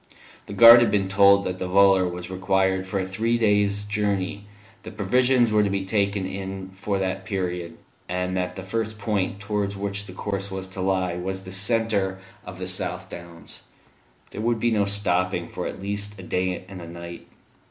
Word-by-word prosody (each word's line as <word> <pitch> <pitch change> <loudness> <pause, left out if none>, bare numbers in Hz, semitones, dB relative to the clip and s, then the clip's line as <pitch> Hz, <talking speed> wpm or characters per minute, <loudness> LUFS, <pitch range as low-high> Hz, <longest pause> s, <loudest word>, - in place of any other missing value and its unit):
The - - -7
guard 115 +3 +10
had 120 - +3
been 100 -2 +1
told 100 0 +5
that 90 -1 -4
the 95 - -3
volor 95 -1 +5
was 90 +1 -7
required 95 0 0
for 95 +1 -2
a 95 - -1
three 110 +5 0
days' 105 -2 +2
journey, 105 -1 -2 0.4
that - - -11
provisions 125 +3 +3
were 105 0 +4
to 100 - +1
be 100 -1 -2
taken 100 -1 0
in 95 0 -6
for 100 +1 -2
that 95 0 -2
period, 90 -4 -4 0.3
and 90 +1 -2
that 90 -1 -2
the 95 - -7
first 110 +3 -3
point 100 -3 -2
towards 100 -1 -2
which 100 +1 -3
the 90 - -9
course 100 0 -3
was 95 -1 -4
to 95 0 -7
lie 95 -2 0
was 95 +1 -4
the 95 - -9
centre 100 -1 +1 0.3
of 90 0 -9
the 90 0 -5
South 90 0 -3
Downs. 85 -1 -10 0.7
There - - -6
would 115 +1 +1
be 120 +1 +1
no 105 -2 +2
stopping 95 -2 +1
for - - -5
at - - -7
least 100 +1 -3
a 95 - -10
day 90 +1 -2
and 95 -2 -9
a 85 - -9
night. 85 0 -9
95 Hz, 195 wpm, -24 LUFS, 95-105 Hz, 0.7 s, guard